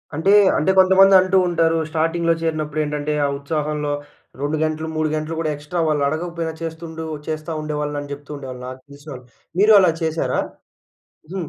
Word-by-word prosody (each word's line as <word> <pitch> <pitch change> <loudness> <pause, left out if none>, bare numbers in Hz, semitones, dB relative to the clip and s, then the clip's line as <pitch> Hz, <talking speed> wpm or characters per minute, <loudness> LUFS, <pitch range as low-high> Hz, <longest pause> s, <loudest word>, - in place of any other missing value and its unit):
అంటే 175 +6 +2 0.3
అంటే 190 +5 +2
కొంతమంది 190 +1 +6
అంటూ 185 +1 +2
ఉంటారు. 165 -1 +2
స్టార్టింగ్‌‌లో 165 +1 +1
చేరినప్పుడు 155 -2 -2
ఏంటంటే 150 0 -2
ఆ - - +2
ఉత్సాహంలో 150 0 -2 0.5
2 145 +2 -1
గంటలు, 155 0 -2
3 155 -1 0
గంటలు 155 +1 -3
గూడా 155 -2 -1
ఎక్స్ట్రా 150 +4 -5
వాళ్ళు 150 -2 +1
అడగకపోయినా 165 +1 -3
చేస్తుండు 160 0 -6 0.2
చేస్తా 155 +1 -4
ఉండేవాళ్ళు 150 -1 -3
అని 145 - -9
చెప్తూ 145 +1 -12
ఉండేవాళ్ళు 130 -2 -8
నాకు 130 0 -8
తెలిసినోళ్ళు. 140 -3 -11 0.3
మీరు 215 +1 +6
అలా 180 -3 +4
చేశారా? 160 0 -1 0.9
హ్మ్. 180 -5 -4
155 Hz, 155 wpm, -21 LUFS, 150-165 Hz, 0.9 s, కొంతమంది